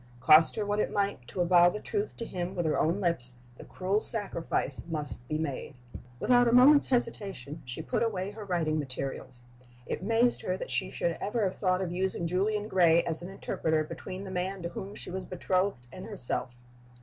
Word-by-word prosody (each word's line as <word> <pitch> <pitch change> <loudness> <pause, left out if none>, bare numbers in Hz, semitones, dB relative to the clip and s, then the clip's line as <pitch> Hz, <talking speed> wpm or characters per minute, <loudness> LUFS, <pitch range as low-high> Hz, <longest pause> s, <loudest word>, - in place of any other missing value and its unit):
Cost 155 +6 +6
her 215 - -1
what 205 +1 0
it - - 0
might 200 -11 -1
to 180 - -3
avow 175 0 +6
the 210 - -5
truth 415 - -3
to 230 - -5
him 180 -1 -4
with 175 -2 -1
her 155 - +1
own 170 +5 +1
lips, 125 -10 0 0.2
the - - -8
cruel 190 +3 -1
sacrifice 180 - -3
must 145 -6 -4
be 155 - -1
made. 145 -3 -4 0.4
Without 245 -1 +4
a - - +3
moment's 270 +4 +7
hesitation 195 - -2
she 125 +6 -6
put - - -1
away 200 -4 -1
her 215 +1 -8
writing 165 -5 0
materials. 130 -2 -3 0.4
It - - -4
amazed 230 +4 +2
her - - -2
that - - -6
she - - 0
should - - -2
ever 220 +2 -1
have 190 -2 -2
thought 185 -2 +1
of 175 - -3
using 185 -1 -1
Julian 205 +5 0
Gray 170 -4 +4
as 160 -1 -1
an 175 - -7
interpreter 160 -4 -1
between 175 +4 -7
the 190 - -7
man 185 0 -3
to 170 - -2
whom 195 +3 -7
she - - -4
was 190 +1 -4
betrothed 185 -6 -1
and - - -9
herself. 125 +1 -1
185 Hz, 200 wpm, -29 LUFS, 160-205 Hz, 0.4 s, moment's